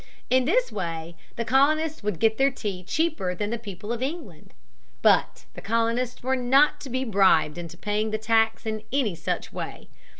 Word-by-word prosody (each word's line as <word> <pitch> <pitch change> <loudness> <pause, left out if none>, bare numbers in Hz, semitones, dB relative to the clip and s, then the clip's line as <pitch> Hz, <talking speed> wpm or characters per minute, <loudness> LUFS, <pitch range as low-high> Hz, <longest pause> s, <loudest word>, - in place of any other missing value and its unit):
In 255 0 +4
this - - +2
way 165 -1 -4 0.2
the 230 - -3
colonists 305 +5 +2
would 210 -4 -2
get 220 +5 +2
their 270 +1 +5
tea 205 -8 -5
cheaper 295 - -1
than 205 +4 -3
the 235 - -2
people 205 0 -6
of 240 - -5
England. 270 - -6 0.5
But - - +3
the - - -9
colonists 230 +3 -1
were 260 +1 +1
not 265 +4 +3
to 275 - -7
be 260 +1 -1
bribed 185 - +3
into 170 0 -8
paying 210 +2 -1
the 215 - -1
tax 225 +1 +1
in 215 -1 -3
any 255 -7 +1
such 165 - -4
way. - - -7
225 Hz, 180 wpm, -25 LUFS, 200-265 Hz, 0.5 s, their